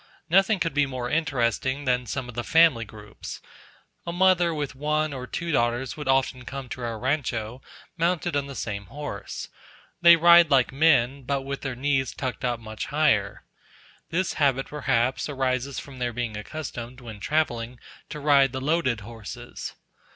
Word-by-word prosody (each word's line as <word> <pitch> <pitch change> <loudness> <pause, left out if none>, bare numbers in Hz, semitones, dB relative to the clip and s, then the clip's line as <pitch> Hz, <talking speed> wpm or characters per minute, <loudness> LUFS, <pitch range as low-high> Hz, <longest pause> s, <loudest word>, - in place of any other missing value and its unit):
Nothing 195 +3 +4
could 165 -4 -1
be 145 -1 +2
more 125 -2 -4
interesting 135 -2 0
than 125 -1 +1
some 130 +2 -3
of 125 - -8
the 120 +1 -3
family 160 -6 +4
groups. 105 -1 -10 0.7
A - - -1
mother 175 -1 +4
with 145 -4 -3
one 150 +2 0
or 130 -1 -6
two 170 +4 -3
daughters 120 -1 0
would 150 -3 -7
often 135 -1 +1
come 135 +1 -7
to 125 - -6
our 115 -2 -3
rancho, 125 -2 -2 0.4
mounted 170 -1 0
on 140 -1 0
the 140 - -8
same 100 -5 -4
horse. 145 +1 -6 0.5
They 170 -1 +9
ride 170 0 +7
like 135 -3 +4
men, 140 -3 +3
but 135 +1 -2
with 140 0 -5
their 135 -3 -4
knees 135 0 0
tucked 130 0 -4
up 120 -2 0
much 110 -1 -6
higher. 135 -10 +1 0.7
This 185 +2 0
habit, 135 -2 +3
perhaps, 130 -2 0
arises 130 -1 -1
from 135 -2 -8
their 120 -1 -1
being 120 -2 -3
accustomed, 125 +1 -6
when 115 -4 -9
travelling, 120 -3 -1 0.3
to 150 - -6
ride 140 -3 +4
the 130 - -2
loaded 135 -5 0
horses. 115 +2 -8
135 Hz, 165 wpm, -25 LUFS, 120-150 Hz, 0.7 s, They